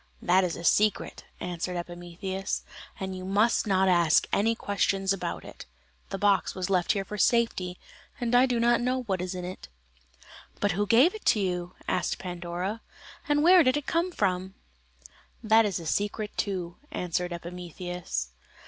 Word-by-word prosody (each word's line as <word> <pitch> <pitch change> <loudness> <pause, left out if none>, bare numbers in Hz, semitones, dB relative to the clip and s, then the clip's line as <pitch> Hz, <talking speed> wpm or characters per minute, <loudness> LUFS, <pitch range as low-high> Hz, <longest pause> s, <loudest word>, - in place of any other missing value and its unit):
"That 185 +2 +3
is 175 -3 -1
a 170 - -8
secret," 210 +4 +1
answered 180 0 -3
Epimetheus, 175 +2 -4 0.4
"and 190 -1 -4
you 185 - -7
must 210 +5 +2
not 190 -1 +3
ask 170 -4 +4
any 225 +3 +2
questions 195 -2 0
about 195 - -4
it; - - -11 0.4
the - - -3
box 200 0 +2
was 185 0 -3
left 180 -2 +2
here 195 -1 -2
for 210 +1 -6
safety, 195 -7 +2 0.4
and 240 -1 -1
I 250 +2 +6
do 245 -2 0
not 235 +1 +3
know 255 +1 0
what 190 -6 -2
is 185 0 -4
in 180 -1 -5
it." 185 +1 -8 0.9
"But 205 - +2
who 205 +4 -1
gave 255 - +5
it 435 - +2
you?" 180 -3 -2
asked 180 - 0
Pandora, 180 +4 -4 0.5
"and 295 0 +3
where 360 +2 +8
did 255 -2 +3
it 295 - -4
come 340 +2 0
from?" 190 - -1 0.9
"That 220 0 +5
is 190 -3 -2
a 165 - -8
secret 210 +4 -1
too," 180 -4 -3
answered 180 0 -2
Epimetheus. 175 - -5
190 Hz, 165 wpm, -28 LUFS, 180-220 Hz, 0.9 s, where